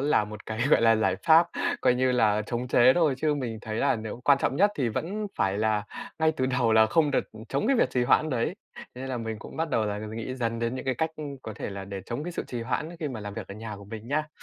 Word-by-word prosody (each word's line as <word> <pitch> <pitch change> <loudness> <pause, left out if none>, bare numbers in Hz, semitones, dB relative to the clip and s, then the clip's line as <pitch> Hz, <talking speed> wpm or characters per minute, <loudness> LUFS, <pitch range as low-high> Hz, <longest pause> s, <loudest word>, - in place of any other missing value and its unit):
là 140 -6 +3
một 105 0 -10
cái, 110 0 -4
gọi - - +5
là, 115 -1 +5
giải 95 -4 +1
pháp, 165 +1 +7 0.3
coi 125 -1 +4
như 130 0 +2
là, 110 -3 +3
chống 120 +2 -3
chế 125 +1 +6
thôi 160 -6 +3
chứ 150 0 +1
mình 120 -6 -4
thấy 110 0 -4
là 140 0 +2
nếu 110 +2 -6
quan 140 -1 +5
trọng 135 0 0
nhất 205 +4 +4
thì 130 -4 +1
vẫn 200 - -3
phải 95 +1 +1
là 105 -1 +1 0.3
ngay 160 0 +3
từ 130 - +1
đầu 125 -3 +2
là 110 0 +6
không 150 +7 +2
được, 140 - -1
ừm, 110 0 -10
chống - - -1
cái 270 +1 +3
việc - - +3
trì 125 - +1
hoãn 155 +5 +3
đấy. 120 -4 0 0.2
Thế - - -10
nên 135 - -4
là 130 - -2
mình 110 -1 -4
cũng - - -11
bắt 160 -1 -1
đầu 110 - +2
là 105 0 -2
nghĩ 110 +4 -5
dần 115 -2 -2
đến 115 +2 -1
những 130 - -5
cái 130 - 0
cách 160 +6 -1 0.3
có 110 - -6
thể - - -5
là 100 -1 -6
để 100 0 -6
chống 125 +6 -4
cái 175 - -4
sự - - -4
trì 120 -2 -4
hoãn 130 +6 -2
ấy 170 - -10
khi 150 - -1
mà 120 -5 -6
làm 105 -1 -6
việc 110 -4 -6
ở 100 - -7
nhà 110 0 -7
của 100 - -11
mình 110 +3 -8
nha. 155 +2 0
120 Hz, 295 wpm, -27 LUFS, 110-140 Hz, 0.3 s, pháp